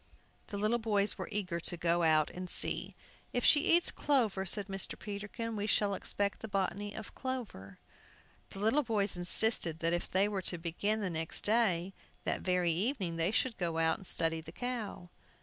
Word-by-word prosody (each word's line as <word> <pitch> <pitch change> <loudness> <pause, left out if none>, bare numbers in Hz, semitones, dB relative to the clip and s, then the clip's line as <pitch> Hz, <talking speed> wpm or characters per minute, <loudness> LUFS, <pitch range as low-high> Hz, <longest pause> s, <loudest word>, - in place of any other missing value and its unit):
The 205 - -5
little 215 +4 +1
boys 210 -2 +1
were - - -5
eager 185 -5 -2
to 175 +1 +2
go 170 +1 +1
out 155 -2 +3
and 180 0 -6
see. - - +2 0.4
"If 245 - 0
she 295 - +7 0.2
eats 350 - +1
clover," 225 -9 +1
said 205 +2 +1
Mr. 195 0 -4
Peterkin, 210 +3 -5
"we 205 0 -2
shall 205 -1 +2
expect 200 +1 -2
the 220 - -7
botany 200 0 -2
of 220 - -8
clover." 220 - -6 0.7
The - - -10
little 220 +9 +2
boys 210 -7 -1
insisted 175 -1 +4
that 170 +1 -1
they 195 +2 +3
were 200 -2 -3
to 175 - -1
begin 190 +6 -2
the 190 -3 -2
next 160 0 -1
day; 195 -5 +1 0.3
that - - -2
very 180 -2 +1
evening 190 - -1
they 165 +2 +1
should 225 +2 -1
go 170 -3 -1
out 160 0 +2
and 190 - -6
study 165 0 0
the - - -11
cow. 225 -8 -5
195 Hz, 185 wpm, -32 LUFS, 175-220 Hz, 0.7 s, she